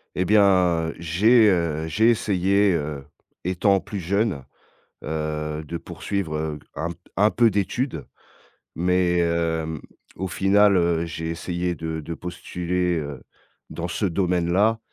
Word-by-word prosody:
Et 90 Hz, -, +1 dB
bien 90 Hz, -5 st, +3 dB
j'ai, 105 Hz, +8 st, +4 dB
heu, 80 Hz, -4 st, 0 dB
j'ai 110 Hz, +9 st, +3 dB
essayé, 100 Hz, -2 st, +2 dB
heu, 75 Hz, -3 st, -3 dB, 0.4 s
étant 95 Hz, +2 st, +2 dB
plus 100 Hz, +1 st, -6 dB
jeune, 95 Hz, -, -1 dB, 0.6 s
heu, 75 Hz, 0 st, -3 dB
de 85 Hz, -, -4 dB
poursuivre, 90 Hz, -1 st, -4 dB
heu, 75 Hz, -1 st, -3 dB, 0.2 s
un 85 Hz, +2 st, -3 dB
p -, -, -9 dB, 0.2 s
un 105 Hz, +2 st, +5 dB
peu 120 Hz, -1 st, +4 dB
d'études 110 Hz, +6 st, -2 dB, 0.7 s
mais 90 Hz, 0 st, +2 dB
heu, 80 Hz, -2 st, -1 dB, 0.4 s
au 95 Hz, -, -3 dB
final, 100 Hz, +2 st, +4 dB
hem, 85 Hz, -1 st, +1 dB
j'ai 80 Hz, 0 st, -5 dB
essayé 85 Hz, +1 st, -2 dB
de 80 Hz, -1 st, -4 dB
de 85 Hz, +2 st, -6 dB
postuler 90 Hz, 0 st, -2 dB
heu, 70 Hz, -4 st, -6 dB, 0.5 s
dans 85 Hz, +1 st, -4 dB
ce 90 Hz, +5 st, -2 dB
domaine-là 90 Hz, +4 st, +1 dB
85 Hz, 135 wpm, -23 LUFS, 80-100 Hz, 0.7 s, un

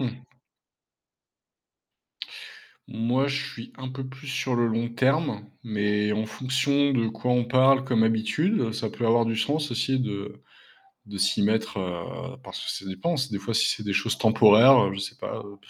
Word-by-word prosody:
Mmh. 125 Hz, -2 st, -3 dB, 2.7 s
Moi, 120 Hz, +5 st, 0 dB
je 145 Hz, +1 st, -2 dB
suis 115 Hz, 0 st, -10 dB
un 130 Hz, 0 st, -6 dB
peu 130 Hz, +1 st, -6 dB
plus 135 Hz, +2 st, -11 dB
sur 130 Hz, -1 st, -2 dB
le 120 Hz, 0 st, +2 dB
long 115 Hz, +1 st, -1 dB
terme, 130 Hz, -3 st, 0 dB, 0.2 s
mais 105 Hz, -2 st, 0 dB
en 110 Hz, +1 st, -1 dB
fonction 135 Hz, +4 st, 0 dB
de 120 Hz, -4 st, +1 dB
quoi 110 Hz, +3 st, -3 dB
on 125 Hz, -1 st, +2 dB
parle 130 Hz, +2 st, +4 dB
comme 120 Hz, -4 st, +2 dB
habitudes, 115 Hz, -, +1 dB
ça 110 Hz, -1 st, -3 dB
peut 120 Hz, -, -3 dB
avoir 115 Hz, +1 st, +4 dB
du 115 Hz, 0 st, -2 dB
sens 150 Hz, +5 st, -1 dB
aussi 125 Hz, +2 st, 0 dB
de 105 Hz, -4 st, -5 dB, 0.7 s
de 100 Hz, -1 st, -7 dB
s'y 95 Hz, 0 st, +1 dB
mettre, 110 Hz, 0 st, 0 dB
heu, 90 Hz, -2 st, -6 dB
parce -, -, -8 dB
que -, -, -5 dB
ça -, -, -5 dB
dépend. 155 Hz, -, -2 dB
C'est 130 Hz, -2 st, -2 dB
des 100 Hz, -, -3 dB
fois, 110 Hz, +3 st, -4 dB
si 115 Hz, -, +3 dB
c'est -, -, -2 dB
des 100 Hz, -1 st, -2 dB
choses 95 Hz, 0 st, 0 dB
temporaires, 110 Hz, +3 st, +7 dB
heu, 95 Hz, -, -2 dB
je 95 Hz, -, -5 dB
sais 100 Hz, -, -5 dB
pas -, -, -6 dB
heu, 100 Hz, 0 st, -12 dB
115 Hz, 185 wpm, -25 LUFS, 105-130 Hz, 2.7 s, temporaires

